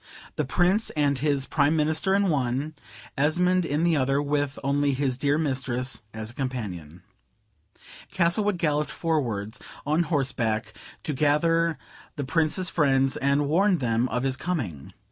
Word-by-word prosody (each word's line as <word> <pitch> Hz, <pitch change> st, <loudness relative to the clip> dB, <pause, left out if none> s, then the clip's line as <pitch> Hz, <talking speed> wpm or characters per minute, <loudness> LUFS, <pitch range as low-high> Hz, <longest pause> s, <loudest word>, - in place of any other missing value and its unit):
The 150 Hz, -, -1 dB
Prince 180 Hz, -, +2 dB
and 140 Hz, -2 st, +2 dB
his 140 Hz, -1 st, +1 dB
Prime 145 Hz, +1 st, +2 dB
Minister 160 Hz, +5 st, +1 dB
in 200 Hz, -1 st, +2 dB
one, 140 Hz, +1 st, -1 dB, 0.4 s
Esmond 175 Hz, +5 st, +2 dB
in 150 Hz, +3 st, 0 dB
the 170 Hz, -1 st, +3 dB
other, 135 Hz, +1 st, +1 dB
with 145 Hz, -1 st, -1 dB
only 140 Hz, +1 st, +1 dB
his 130 Hz, -2 st, 0 dB
dear 140 Hz, +3 st, +1 dB
mistress 130 Hz, -4 st, -1 dB
as 110 Hz, +1 st, -6 dB
a -, -, -18 dB
companion. 95 Hz, -, -5 dB, 1.1 s
Castlewood 190 Hz, +2 st, +2 dB
galloped 150 Hz, -3 st, 0 dB
forwards 120 Hz, -, -2 dB, 0.3 s
on 155 Hz, +4 st, +2 dB
horseback 130 Hz, -9 st, -1 dB, 0.3 s
to 150 Hz, -, -2 dB
gather 165 Hz, +3 st, +2 dB, 0.4 s
the 145 Hz, -, -3 dB
Prince's 160 Hz, +5 st, +1 dB
friends 135 Hz, -3 st, +2 dB
and 140 Hz, +1 st, +1 dB
warn 185 Hz, +5 st, +3 dB
them 120 Hz, -2 st, 0 dB
of 125 Hz, +2 st, -2 dB
his 135 Hz, -1 st, 0 dB
coming. 110 Hz, -, -4 dB
145 Hz, 145 wpm, -26 LUFS, 130-160 Hz, 1.1 s, the